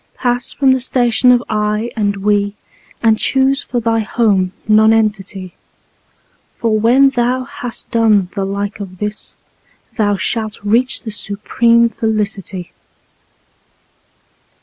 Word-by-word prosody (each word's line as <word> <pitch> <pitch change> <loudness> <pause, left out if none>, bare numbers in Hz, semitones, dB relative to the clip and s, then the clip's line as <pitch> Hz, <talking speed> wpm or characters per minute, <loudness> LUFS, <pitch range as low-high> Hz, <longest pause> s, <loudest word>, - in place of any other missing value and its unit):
Pass 245 -1 +1
from 270 -2 +2
the 260 - +2
station 245 -1 +2
of 245 -1 +3
"I" 210 +2 -1
and 205 -3 0
"We," 205 0 0 0.5
and 220 -1 +3
choose 270 +1 +2
for 245 - -3
thy 225 0 0
home 205 -4 +1 0.2
Nonentity, 215 -4 +2 1.0
For 225 -2 0
when 260 +5 +4
thou 250 0 0
has 255 -3 -6
done 215 -5 +2
the 195 - -2
like 200 +1 -4
of 190 -2 -8
this, 210 +2 -4 0.6
thou 205 -3 +1
shalt 220 +1 -2
reach 235 +5 +1
the 220 - -6
supreme 230 +3 +1
Felicity. 210 -5 -3
220 Hz, 120 wpm, -16 LUFS, 205-240 Hz, 1.0 s, when